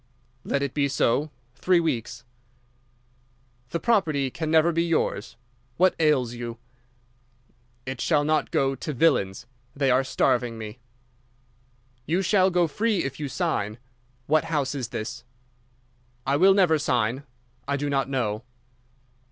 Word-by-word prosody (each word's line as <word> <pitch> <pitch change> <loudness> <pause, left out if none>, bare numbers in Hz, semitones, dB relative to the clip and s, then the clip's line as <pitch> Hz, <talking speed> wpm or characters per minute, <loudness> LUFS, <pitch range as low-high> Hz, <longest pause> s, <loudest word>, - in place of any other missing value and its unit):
_' - - -40 0.4
"'Let 140 - -1
it 140 - -3
be 145 -1 +1
so. 140 +2 +1 0.2
Three 180 +6 +2
weeks.' 125 -8 -2 1.5
"'The 170 - -2
property 155 - +1
can 160 +3 -4
never 160 +1 +4
be 165 0 +1
yours. 160 -10 -1 0.4
What 185 +2 +4
ails 140 -7 +2
you?' 120 -1 -6 1.3
"'It 130 -1 -5
shall 150 -3 +2
not 155 +1 +1
go 135 0 +1
to 150 +3 -5
villains. 125 -9 +1 0.3
They 135 -2 +2
are 130 +2 +3
starving 125 -3 0
me.' 110 +2 -8 1.3
"'You 175 +5 +1
shall 190 0 +3
go 175 -2 +2
free 210 +5 0
if 135 +1 -5
you 150 - -3
sign. 115 - -2 0.5
What 155 +3 +2
house 145 -4 -1
is 130 -5 -3
this?' 120 +1 -6 1.0
"'I 135 +1 +1
will 190 +4 +6
never 175 -6 +4
sign. 125 -3 0 0.5
_I 140 0 0
do 145 +1 -2
not 135 -1 0
know. 115 -6 -1
140 Hz, 140 wpm, -25 LUFS, 125-165 Hz, 1.5 s, will